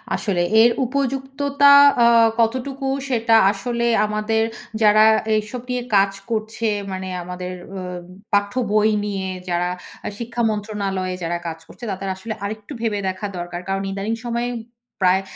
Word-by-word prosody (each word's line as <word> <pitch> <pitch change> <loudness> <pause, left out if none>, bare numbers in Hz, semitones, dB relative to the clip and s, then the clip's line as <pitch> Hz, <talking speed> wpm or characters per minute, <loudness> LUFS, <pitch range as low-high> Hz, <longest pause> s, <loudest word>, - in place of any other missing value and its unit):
আসলে 185 -5 -1 0.2
এর 235 - +7 0.2
উপযুক্ততা 275 +2 +2 0.3
আ - - +6 0.3
কতটুকু 260 +4 0 0.2
সেটা 230 -2 +3 0.2
আসলে 235 +4 -2 0.2
আমাদের 215 +1 0 0.4
যারা 215 0 +6 0.4
এসব 225 +3 -6
নিয়ে 250 -1 -1
কাজ 195 0 +4 0.2
করছে 220 +1 -3 0.3
মানে 190 0 -4 0.2
আমাদের 180 0 -6 0.2
অ - - -4 0.5
পাঠ্য 205 +1 +2 0.2
বই 215 0 +4 0.2
নিয়ে 195 -2 -3 0.2
যারা 175 +1 0 0.4
আ - - -2
শিক্ষা 235 +1 -3
মন্ত্রণালয়ে 200 -3 -2
যারা 170 +1 -1
কাজ 165 0 -5
করছে 245 - -15
তাদের 195 +1 -4
আসলে 215 +4 -5
আরেকটু 215 +6 -6
ভেবে 215 -3 0
দেখা 185 +2 -5
দরকার। 175 0 -5
কারণ 195 0 -1
ইদানিং 200 +3 -2
সময়ে 240 +1 -1 0.5
প্রায় 185 +1 +4
215 Hz, 140 wpm, -21 LUFS, 195-235 Hz, 0.5 s, এর